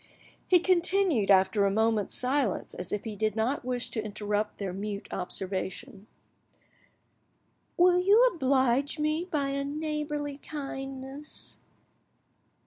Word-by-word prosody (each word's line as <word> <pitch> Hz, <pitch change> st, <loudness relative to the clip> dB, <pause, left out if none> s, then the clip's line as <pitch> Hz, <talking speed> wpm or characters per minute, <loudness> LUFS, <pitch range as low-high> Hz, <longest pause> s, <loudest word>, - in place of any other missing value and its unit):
He 365 Hz, -, +6 dB
continued 355 Hz, -, +3 dB
after 190 Hz, +1 st, +4 dB
a 200 Hz, -, +3 dB
moment's 220 Hz, 0 st, +1 dB
silence, 255 Hz, -5 st, 0 dB
as 180 Hz, -1 st, -6 dB
if 210 Hz, -, -2 dB
he 220 Hz, -2 st, -5 dB
did 215 Hz, 0 st, -1 dB
not 230 Hz, +6 st, 0 dB
wish 250 Hz, -1 st, -2 dB
to 220 Hz, -, -2 dB
interrupt 210 Hz, 0 st, -2 dB
their 195 Hz, -3 st, -4 dB
mute 200 Hz, +1 st, -5 dB
observation— 190 Hz, +2 st, -5 dB, 1.7 s
"Will 355 Hz, 0 st, +5 dB
you 400 Hz, +5 st, +5 dB
oblige 265 Hz, -1 st, +2 dB
me 305 Hz, +3 st, 0 dB
by 295 Hz, -6 st, -1 dB
a 275 Hz, 0 st, -2 dB
neighbourly 295 Hz, -1 st, -3 dB
kindness?" 270 Hz, 0 st, -7 dB
260 Hz, 120 wpm, -28 LUFS, 210-300 Hz, 1.7 s, He